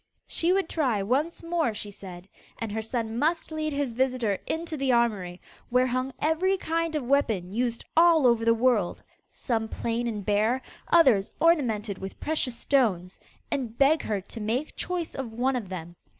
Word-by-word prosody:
She 335 +2 +1
would 385 -2 +2
try 250 -13 0
once 285 - -1
more 335 -9 0
she 205 0 -6
said, 185 -2 -10 0.3
and 225 -2 -4
her 220 +1 -2
son 225 0 -3
must 325 +3 0
lead 310 -1 -2
his 280 -4 -2
visitor 245 -5 0
into 325 0 -3
the 270 -3 0
armoury, 205 -7 +1 0.3
where 250 +1 +3
hung 255 +1 -1
every 355 +5 +1
kind 330 -2 -1
of 300 - -1
weapon 225 -9 +1
used 235 0 -1
all 330 -3 +6
over 235 -2 +4
the 230 - +4
world 225 -6 +1 0.3
some 225 -3 -2
plain 235 +2 -2
and 210 -4 -4
bare, 215 +5 +1 0.2
others 260 -13 +4
ornamented 230 - +2
with 190 0 -7
precious 280 -6 -1
stones 195 -10 +1 0.3
and 240 -4 -3
beg 290 +3 +4
her 210 -2 -2
to 220 +4 -9
make 240 +8 -2
choice 355 -2 -3
of 250 -4 -5
one 255 +3 +1
of 220 -7 -4
them. 175 -2 -7
245 Hz, 175 wpm, -27 LUFS, 215-305 Hz, 0.3 s, all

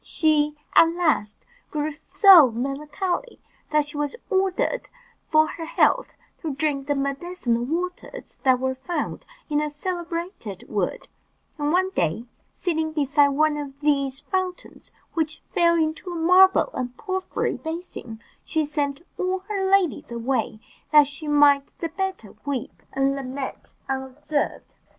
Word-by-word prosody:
She, 300 -1 +1 0.2
at 330 - +8
last, 310 -12 0 0.2
grew 305 0 -2
so 335 - +7
melancholy, 295 - -3 0.3
that 300 -1 +2
she 290 0 -8
was 295 +4 -1 0.2
ordered 385 +5 0 0.4
for 310 0 +5
her 325 +1 -6
health - - +2 0.3
to 310 -5 -3
drink 280 -1 -1
the 290 - +1
medicinal 275 -3 -1
waters 355 +6 -5
that 260 -2 +4
were 260 0 0
found 270 +7 -4 0.2
in 295 -1 +1
a 300 - -1
celebrated 335 - -5
wood; 200 -4 -2 0.5
and 295 0 0
one 375 +2 +2
day, 170 - -1 0.3
sitting 320 -3 -1
beside 285 -1 +3
one 300 +2 +2
of 280 -2 -7
these 275 -2 +1
fountains, 370 +3 -4 0.2
which 315 -1 -2
fell 340 -1 +4
into 320 +2 -1
a - - -5
marble 370 +7 +5
and 250 -1 -4
porphyry 375 -1 -2
basin, 320 -9 -7 0.2
she 315 -2 0
sent 290 0 -2 0.2
all 370 0 0
her 390 -2 0
ladies 385 -7 +2
away, 235 -1 -1 0.3
that 300 -1 +8
she 290 +2 -9
might 290 -1 +4
the 330 - -3
better 380 - -4
weep 280 -4 -4
and 270 0 +1
lament 270 0 -6
unobserved. 270 +3 -3
300 Hz, 135 wpm, -24 LUFS, 275-345 Hz, 0.5 s, at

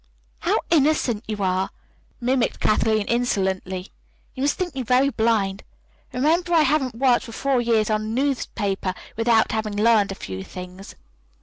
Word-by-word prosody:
"How - - +1
innocent 285 -8 +2
you 210 -2 -3
are!" 185 0 0 0.5
mimicked 250 0 0
Kathleen 215 0 +2
insolently. 190 -6 -1 0.4
"You 260 - -7
must 285 +1 +2
think 360 -3 -3
me 265 - -3
very 255 +3 +3
blind. 220 -6 0 0.5
Remember, 330 +7 +1
I 325 - +6
haven't 270 -4 +1
worked 250 0 +2
for 230 - -9
four 265 +2 0
years 225 -2 +1
on 215 0 +1
a - - -5
newspaper 220 -6 -1 0.2
without 225 0 +3
having 220 -1 -2
learned 215 -2 +3
a - - -5
few 95 - -6
things." 180 - -10
225 Hz, 150 wpm, -23 LUFS, 200-260 Hz, 0.5 s, I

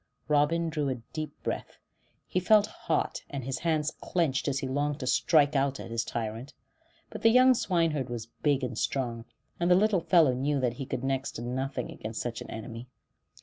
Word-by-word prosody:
Robin 155 +3 +2
drew 150 -3 -1
a 130 - -1 0.2
deep 155 -1 -3
breath; - - -4 0.5
he 185 - 0
felt 210 +3 +5
hot, - - -2
and 140 -2 -5
his 130 +1 -3
hands 155 -2 0
clenched 160 -7 0
as 140 -1 +1
he 135 - -2
longed 145 +2 -1
to 130 - -4
strike 145 +3 +3
out 135 0 +1
at - - -8
his 115 0 0
tyrant. 115 +4 -5 0.6
But - - -7
the 225 - +6
young 255 +2 +7
swineherd 165 - 0
was 120 -2 -4 0.2
big 140 -3 +2
and 125 -2 -3
strong, 115 -1 -2 0.3
and 175 0 +1
the 180 - +7
little 200 -1 +3
fellow 165 -7 +5
knew 140 +3 0
that 125 -2 0
he 130 +2 -6
could 130 - -3
do 135 - -2
next 135 0 -1
to 115 - -6
nothing 130 +1 -3
against 110 +1 -6
such 120 -1 -4
an - - -8
enemy. 115 +2 -7
140 Hz, 200 wpm, -29 LUFS, 125-160 Hz, 0.6 s, young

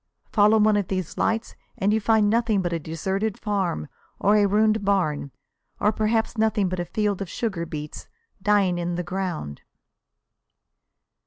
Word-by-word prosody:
Follow 210 +1 +5
one 215 0 +4
of 200 -3 -1
these 185 -4 -3
lights 225 +1 -1 0.2
and 200 +2 +1
you 220 - +1
find 220 0 +3
nothing 220 -2 +2
but 175 -1 -1
a 165 - -1
deserted 190 +7 -3
farm, 190 - -1 0.3
or 205 +1 +3
a 205 -1 +4
ruined 215 +1 +2
barn, 180 -8 0 0.5
or 210 - +3
perhaps 220 +1 0
nothing 220 -3 +2
but 185 0 -3
a 175 - -2
field 205 0 -1
of 195 - -4
sugar 190 -8 -3
beets 150 -1 -7 0.3
dying 195 -3 +2
in 175 0 -2
the 175 - -2
ground. 175 - -4
200 Hz, 160 wpm, -24 LUFS, 175-215 Hz, 0.5 s, Follow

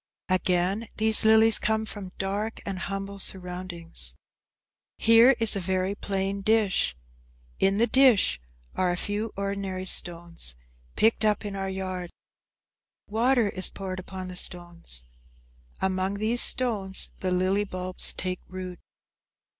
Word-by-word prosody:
Again, 185 +3 +1
these 220 0 +4
lilies 220 0 +6
come 220 0 0
from 200 -4 -7
dark 205 +3 -3
and 195 -2 -4
humble 195 +1 -5
surroundings. 180 - -2 0.8
Here 230 +4 +6
is 225 -2 +4
a - - -1
very 185 +1 -1
plain 195 -1 -2
dish. 200 - +1 0.6
In 195 +1 +3
the 230 - +4
dish 240 - +4 0.3
are 185 - +1
a 175 - -2
few 205 +4 -2
ordinary 195 -1 -3
stones; 170 - -2 0.4
picked 225 0 +3
up 210 0 +1
in 200 -1 -4
our 195 0 -3
yard. 185 -2 -4 1.0
Water 230 +1 +2
is 185 -1 +4
poured 185 -1 -6
upon 185 0 -7
the 180 - -8
stones. 175 - -4 0.8
Among 190 +1 0
these 220 +4 +1
stones 205 -7 0
the 185 - -1
lily 185 +3 +1
bulbs 185 -2 -3
take 185 0 -4
root. 185 -1 -7
195 Hz, 130 wpm, -26 LUFS, 185-215 Hz, 1.0 s, lilies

